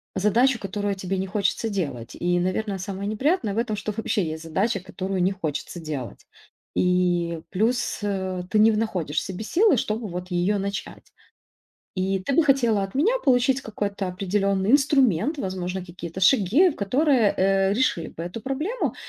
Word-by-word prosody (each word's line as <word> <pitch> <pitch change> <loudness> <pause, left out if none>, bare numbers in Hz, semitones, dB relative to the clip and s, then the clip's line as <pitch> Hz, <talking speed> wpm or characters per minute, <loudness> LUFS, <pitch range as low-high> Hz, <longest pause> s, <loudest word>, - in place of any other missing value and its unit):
задачу, 235 +6 +3
которую 205 0 -3
тебе 190 0 -3
не 190 - -2
хочется 210 +3 -1
делать. 140 - -4
И, 175 0 +1
наверно, 190 +2 -1
самое 195 +2 -4
неприятное 225 - 0
в - - -5
этом, 225 -3 -1
что 210 +1 -4
вообще 210 -4 0
есть 160 +1 -5
задача, 195 +6 0
которую 190 0 -4
не 185 +2 +3
хочется 175 -1 -4
делать. 150 -7 -6 0.5
И 175 -2 +1
плюс, 225 +6 0
э, 190 -3 -2
ты 215 - +1
не 220 +1 +6
в 210 - 0
находишь 175 -9 -2
в - - +4
себе 190 +3 -6
силы, 350 - +3
чтобы 215 +1 -2
вот 180 +1 -6
её 180 +4 +1
начать. 200 0 -5 0.9
И 190 +1 0
ты 270 +8 -2
бы 330 - +5
хотела 235 -8 +3
от 195 - -8
меня 435 - +2
получить 260 0 +3
какой-то 205 -2 -3
определенный 195 +2 0
инструмент, 275 - +3
возможно, 185 -2 -3
какие-то 175 0 -8
шаги, 245 - +5
которые, 250 +1 +2
э, 195 +1 +3
решили 215 -7 0
бы 165 - -8
эту 180 +6 -6
проблему, 300 - -2
200 Hz, 165 wpm, -24 LUFS, 180-230 Hz, 0.9 s, не